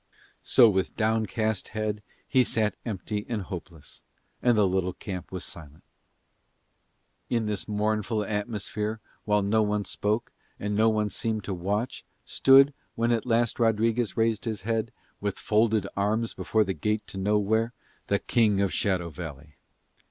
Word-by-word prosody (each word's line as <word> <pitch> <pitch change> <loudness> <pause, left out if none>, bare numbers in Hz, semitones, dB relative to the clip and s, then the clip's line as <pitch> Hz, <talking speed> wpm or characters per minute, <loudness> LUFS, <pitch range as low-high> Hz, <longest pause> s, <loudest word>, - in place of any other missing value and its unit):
So 120 - +6
with 95 -3 0
downcast 110 -1 0
head 105 -1 -1 0.3
he 130 - +4
sat 110 -3 0
empty 105 0 -3
and 110 -4 -2
hopeless, 90 -4 -9 0.4
and 120 -2 +3
the 105 - +5
little 95 -1 0
camp 95 -1 -7
was 95 -2 -4
silent. 80 -3 -9 1.5
In 115 -2 +1
this 105 -2 -3
mournful 105 0 0
atmosphere 105 +1 -3 0.3
while 105 -1 +2
no 110 +2 +3
one 105 -1 0
spoke, 105 +3 -1 0.3
and 105 0 -2
no 110 +2 +4
one 105 -1 0
seemed 110 +1 -2
to 100 - -3
watch, 100 +7 -2 0.2
stood, 135 +1 +6 0.2
when 115 +1 +1
at 115 +1 0
last 120 0 +1
Rodriguez 115 0 +1
raised 115 -1 +1
his 110 -4 -3
head, 115 +1 -1 0.3
with 100 -1 -2
folded 110 -1 +2
arms 110 +3 0
before 105 +4 +1
the 95 - -2
gate 105 +2 -1
to 95 - -7
nowhere, 105 +3 +1 0.4
the 100 - +2
King 105 -2 +2
of 100 -2 +1
Shadow 90 -4 0
Valley. 75 -3 -9
105 Hz, 150 wpm, -27 LUFS, 100-110 Hz, 1.5 s, So